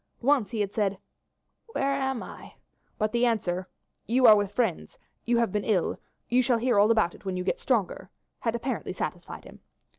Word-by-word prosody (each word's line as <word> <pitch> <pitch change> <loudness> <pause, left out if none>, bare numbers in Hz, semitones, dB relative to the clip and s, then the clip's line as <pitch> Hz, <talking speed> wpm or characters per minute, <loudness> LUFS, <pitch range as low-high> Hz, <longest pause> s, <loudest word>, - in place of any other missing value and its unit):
Once 260 -6 +3
he 220 0 -2
had 200 0 -2
said, 200 -3 0 0.8
"Where 275 0 0
am 265 -3 -2
I?" - - -11 0.4
but 215 -1 0
the 235 +1 +1
answer 185 -5 -1 0.4
"You 255 +3 +3
are 220 -2 +10
with 205 -1 0
friends; 220 -7 -2 0.3
you 235 0 +2
have 235 -4 +1
been 210 0 -1
ill; 195 -6 0 0.3
you 250 +1 +3
shall 245 -1 +2
hear 235 -2 +2
all 210 +2 +5
about 220 -6 +3
it - - -16
when 190 -2 -3
you 180 - -2
get 185 - -1
stronger," 225 -8 -1 0.3
had 230 -2 -1
apparently 255 +3 -3
satisfied - - -5
him. - - -13
225 Hz, 190 wpm, -27 LUFS, 200-245 Hz, 0.8 s, are